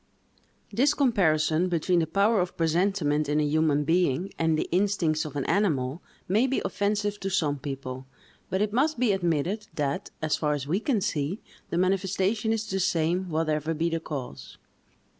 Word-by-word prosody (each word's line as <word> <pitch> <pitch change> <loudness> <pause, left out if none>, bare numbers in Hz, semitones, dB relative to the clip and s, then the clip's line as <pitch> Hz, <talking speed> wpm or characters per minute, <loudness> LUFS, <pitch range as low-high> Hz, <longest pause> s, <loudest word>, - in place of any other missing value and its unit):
THIS 280 +5 +3
comparison 175 - +2
between 175 +1 +1
the 160 - 0
power 200 +5 +3
of 180 0 -4
presentiment 165 -3 +1
in 150 +1 +2
a - - +2
human 150 0 +2
being 170 +1 +1
and 160 -1 +2
the - - -1
instincts 175 -4 +1
of 150 - -7
an 140 - -2
animal, 155 -7 0 0.3
may 215 +8 +3
be 265 - 0
offensive 205 0 -1
to 195 - -3
some 155 -7 0
people; 130 -2 -6 0.4
but 190 +2 +1
it 210 -1 -2
must 290 +6 +2
be 240 -3 +2
admitted, 175 +3 -1
that, 145 -3 -2
as 155 -1 0
far 150 -1 0
as 140 -2 -4
we 170 +7 0
can 225 -2 0
see, 180 -1 -1 0.3
the 170 - -2
manifestation 195 +4 +1
is 220 -1 -1
the 195 - -2
same, 180 0 0
whatever 155 0 -1
be 165 +2 0
the 165 - 0
cause. 125 - -7
170 Hz, 175 wpm, -27 LUFS, 150-200 Hz, 0.4 s, THIS